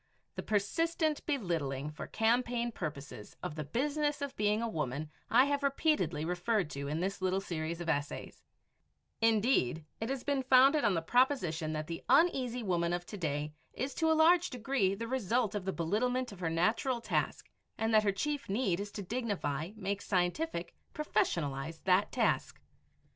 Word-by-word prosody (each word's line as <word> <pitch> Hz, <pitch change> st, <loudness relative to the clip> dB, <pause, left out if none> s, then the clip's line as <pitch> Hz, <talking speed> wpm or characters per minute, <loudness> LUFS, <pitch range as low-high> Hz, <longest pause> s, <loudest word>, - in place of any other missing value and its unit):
The -, -, -4 dB
persistent 310 Hz, -, 0 dB
belittling 160 Hz, -, -1 dB
for 150 Hz, -, -7 dB
campaign 240 Hz, +1 st, +1 dB
purposes 140 Hz, -, -7 dB
of -, -, -3 dB
the 155 Hz, 0 st, -4 dB
Business 290 Hz, -, -1 dB
of 280 Hz, -2 st, -4 dB
Being 210 Hz, +1 st, +2 dB
a -, -, 0 dB
Woman 150 Hz, -, -3 dB, 0.2 s
I 250 Hz, +3 st, +6 dB
have 285 Hz, 0 st, 0 dB
repeatedly 275 Hz, -, +1 dB
referred 180 Hz, 0 st, 0 dB
to 140 Hz, 0 st, -4 dB
in 155 Hz, +3 st, -2 dB
this 195 Hz, +1 st, -2 dB
little 185 Hz, +1 st, +1 dB
series 170 Hz, -3 st, -4 dB
of 175 Hz, -, -5 dB
essays; 145 Hz, -3 st, -3 dB, 0.8 s
indeed, 215 Hz, -, +2 dB
it 225 Hz, -, -3 dB
has 270 Hz, -2 st, -3 dB
been 280 Hz, -2 st, 0 dB
founded 265 Hz, +3 st, +5 dB
on 205 Hz, -4 st, +3 dB
the 165 Hz, -, -1 dB
proposition 180 Hz, -, +1 dB
that 155 Hz, 0 st, -3 dB
the 165 Hz, +1 st, -6 dB
Uneasy 255 Hz, -8 st, +3 dB
Woman 175 Hz, -3 st, 0 dB
of 175 Hz, 0 st, -2 dB
to 210 Hz, -, -8 dB
day 150 Hz, -3 st, -2 dB, 0.2 s
is 265 Hz, +3 st, -3 dB
to 320 Hz, -1 st, +2 dB
a 320 Hz, -, +3 dB
large 345 Hz, +2 st, +5 dB
degree 240 Hz, -6 st, 0 dB
the 230 Hz, +3 st, -5 dB
result 235 Hz, -2 st, 0 dB
of 205 Hz, -3 st, -3 dB
the 190 Hz, -, 0 dB
belittlement 245 Hz, +9 st, 0 dB
of 200 Hz, -, -11 dB
her 170 Hz, -3 st, -1 dB
natural 220 Hz, +9 st, +1 dB
task 225 Hz, -1 st, -1 dB, 0.3 s
and 225 Hz, 0 st, 0 dB
that 215 Hz, -, +7 dB
her 200 Hz, -, +3 dB
chief 290 Hz, +7 st, -3 dB
need 195 Hz, -4 st, +1 dB
is 205 Hz, 0 st, -5 dB
to 205 Hz, -, -5 dB
dignify, 190 Hz, -, -2 dB
make 200 Hz, -1 st, -3 dB
scientific, 180 Hz, -, -1 dB, 0.2 s
professionalize, 160 Hz, -, -1 dB
that 190 Hz, +2 st, +3 dB
task. -, -, 0 dB
205 Hz, 170 wpm, -32 LUFS, 165-255 Hz, 0.8 s, that